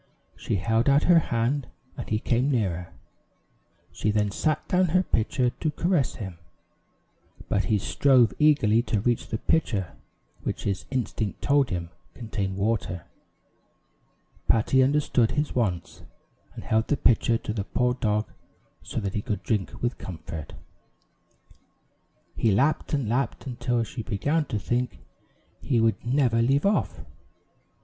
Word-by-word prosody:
She -, -, -2 dB
held 115 Hz, +6 st, +1 dB
out 140 Hz, +2 st, +4 dB
her 175 Hz, -2 st, +6 dB
hand, 125 Hz, 0 st, -1 dB, 0.3 s
and -, -, -7 dB
he 110 Hz, -, +1 dB
came 125 Hz, +4 st, +1 dB
nearer. 95 Hz, -9 st, -1 dB, 1.0 s
She 105 Hz, -, -2 dB
then 105 Hz, -1 st, +1 dB
set 155 Hz, +9 st, -1 dB
down 185 Hz, 0 st, +3 dB
her 185 Hz, +3 st, +2 dB
pitcher 120 Hz, -1 st, 0 dB
to 155 Hz, -, -2 dB
caress 165 Hz, -2 st, 0 dB
him, 95 Hz, -6 st, -7 dB, 1.1 s
but 100 Hz, -, +1 dB
he 110 Hz, -, +2 dB
strove 125 Hz, +3 st, +3 dB
eagerly 140 Hz, -8 st, +4 dB
to 115 Hz, -3 st, -1 dB
reach 120 Hz, +3 st, 0 dB
the 110 Hz, -, -2 dB
pitcher 105 Hz, -, 0 dB, 0.5 s
which -, -, -4 dB
his 100 Hz, -2 st, -2 dB
instinct 115 Hz, -5 st, -3 dB
told 140 Hz, -2 st, +3 dB
him 85 Hz, -2 st, -4 dB, 0.2 s
contained 100 Hz, -5 st, -3 dB
water. 100 Hz, -5 st, -1 dB, 1.4 s
Patty 115 Hz, +4 st, +3 dB
understood 130 Hz, -4 st, +2 dB
his 150 Hz, 0 st, -1 dB
wants, 95 Hz, -8 st, -2 dB, 0.5 s
and -, -, -8 dB
held 110 Hz, +1 st, +1 dB
the 145 Hz, -, +1 dB
pitcher 115 Hz, -1 st, +3 dB
to 110 Hz, -, -5 dB
the 105 Hz, -3 st, -2 dB
poor 125 Hz, +4 st, 0 dB
dog 105 Hz, -3 st, 0 dB, 0.5 s
so -, -, -4 dB
that 100 Hz, -1 st, -3 dB
he 105 Hz, -, -1 dB
could 105 Hz, 0 st, -4 dB
drink 105 Hz, -1 st, -2 dB
with 120 Hz, +1 st, -1 dB
comfort. 80 Hz, -3 st, -7 dB, 1.8 s
He 115 Hz, -, +2 dB
lapped 140 Hz, +8 st, +1 dB
and 135 Hz, -6 st, -1 dB
lapped, 125 Hz, +5 st, -1 dB
until 120 Hz, -2 st, -1 dB
she 115 Hz, +1 st, -6 dB
began 145 Hz, +10 st, 0 dB
to 110 Hz, -, -3 dB
think 120 Hz, +3 st, -2 dB, 0.6 s
he 125 Hz, -5 st, +1 dB
would 115 Hz, 0 st, +1 dB
never 120 Hz, -2 st, +2 dB
leave 135 Hz, +6 st, +2 dB
off. 200 Hz, -, +1 dB
115 Hz, 140 wpm, -26 LUFS, 105-135 Hz, 1.8 s, her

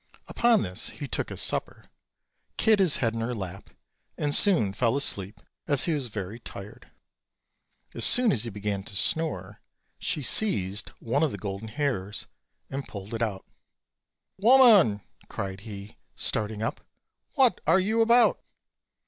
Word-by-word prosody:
Upon 235 Hz, -2 st, +2 dB
this 90 Hz, +3 st, -3 dB
he 145 Hz, -, -8 dB
took -, -, -2 dB
his -, -, -3 dB
supper, -, -, -3 dB, 0.7 s
kid 220 Hz, -2 st, +3 dB
his 180 Hz, -7 st, +2 dB
head 115 Hz, -3 st, -1 dB
in 115 Hz, -, -4 dB
her 120 Hz, +2 st, -3 dB
lap, 100 Hz, -2 st, -8 dB, 0.5 s
and 145 Hz, -1 st, -1 dB
soon 155 Hz, -, +5 dB
fell 115 Hz, +3 st, 0 dB
asleep, 100 Hz, -7 st, -1 dB, 0.3 s
as 145 Hz, -4 st, +1 dB
he 170 Hz, -, 0 dB
was 140 Hz, -4 st, -2 dB
very 105 Hz, 0 st, -7 dB
tired. 100 Hz, -3 st, -11 dB, 1.0 s
As -, -, -2 dB
soon 245 Hz, -3 st, +8 dB
as 115 Hz, -, 0 dB
he 120 Hz, -, -5 dB
began 105 Hz, -1 st, -4 dB
to 100 Hz, -, -6 dB
snore 160 Hz, +11 st, -1 dB, 0.4 s
she 150 Hz, -, -2 dB
seized 105 Hz, -, 0 dB
one 120 Hz, +5 st, -1 dB
of 160 Hz, -4 st, +1 dB
the -, -, -6 dB
golden 100 Hz, +2 st, -6 dB
hairs 110 Hz, -7 st, -3 dB, 0.4 s
and 135 Hz, +1 st, -6 dB
pulled 100 Hz, +1 st, -9 dB
it 115 Hz, -, -4 dB
out. 105 Hz, -4 st, -3 dB, 0.9 s
"Woman!" 215 Hz, -, +5 dB, 0.3 s
cried 95 Hz, -1 st, -5 dB
he, 100 Hz, 0 st, -10 dB, 0.2 s
starting 110 Hz, 0 st, -2 dB
up, 115 Hz, -, -4 dB, 0.5 s
"what 260 Hz, -, +3 dB
are 165 Hz, +4 st, +5 dB
you 220 Hz, +4 st, 0 dB
about?" 235 Hz, +2 st, +3 dB
115 Hz, 150 wpm, -26 LUFS, 100-165 Hz, 1.0 s, soon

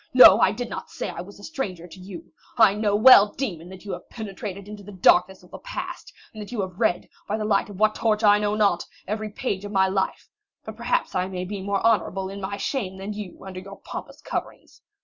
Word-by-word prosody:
No, 225 Hz, -5 st, +10 dB
I 190 Hz, -, +5 dB
did 240 Hz, +3 st, -4 dB
not -, -, -7 dB
say -, -, -5 dB
I 170 Hz, -, -6 dB
was 200 Hz, +3 st, -12 dB
a -, -, -14 dB
stranger 195 Hz, -, -5 dB
to 180 Hz, +2 st, -13 dB
you. 180 Hz, -4 st, -10 dB, 0.2 s
I 220 Hz, -4 st, +6 dB
know 210 Hz, -1 st, +1 dB
well, 210 Hz, -2 st, +8 dB
demon, 180 Hz, -10 st, -4 dB
that 190 Hz, +1 st, -12 dB
you 200 Hz, -, -5 dB
have 180 Hz, 0 st, -7 dB
penetrated 200 Hz, -3 st, -7 dB
into 210 Hz, 0 st, -9 dB
the 205 Hz, +1 st, -11 dB
darkness 185 Hz, 0 st, +3 dB
of 180 Hz, -, -19 dB
the -, -, -9 dB
past, -, -, -7 dB, 0.2 s
and 215 Hz, -, -8 dB
that 205 Hz, -, -9 dB
you 240 Hz, -, -4 dB
have 185 Hz, -1 st, -6 dB
read, 215 Hz, -7 st, +1 dB, 0.2 s
by 210 Hz, -, -1 dB
the 215 Hz, -, -3 dB
light 205 Hz, -1 st, +1 dB
of 200 Hz, -2 st, -10 dB
what 215 Hz, 0 st, +4 dB
torch 220 Hz, -1 st, 0 dB
I 205 Hz, 0 st, +6 dB
know 210 Hz, 0 st, 0 dB
not, 200 Hz, -5 st, +2 dB, 0.2 s
every 215 Hz, +1 st, -3 dB
page 205 Hz, -2 st, -3 dB
of 205 Hz, -, -6 dB
my 190 Hz, -1 st, +3 dB
life; 190 Hz, 0 st, -2 dB, 0.4 s
but -, -, -7 dB
perhaps -, -, -1 dB
I 185 Hz, 0 st, 0 dB
may 185 Hz, -1 st, -4 dB
be 200 Hz, +1 st, -5 dB
more 200 Hz, +1 st, -1 dB
honorable 195 Hz, -4 st, +1 dB
in 200 Hz, +1 st, -7 dB
my 200 Hz, +1 st, -4 dB
shame 200 Hz, -6 st, -3 dB
than 195 Hz, +2 st, -5 dB
you 205 Hz, -3 st, -8 dB
under 185 Hz, -1 st, -7 dB
your 195 Hz, +1 st, -11 dB
pompous -, -, -8 dB
coverings. -, -, -6 dB
200 Hz, 240 wpm, -24 LUFS, 190-215 Hz, 0.4 s, No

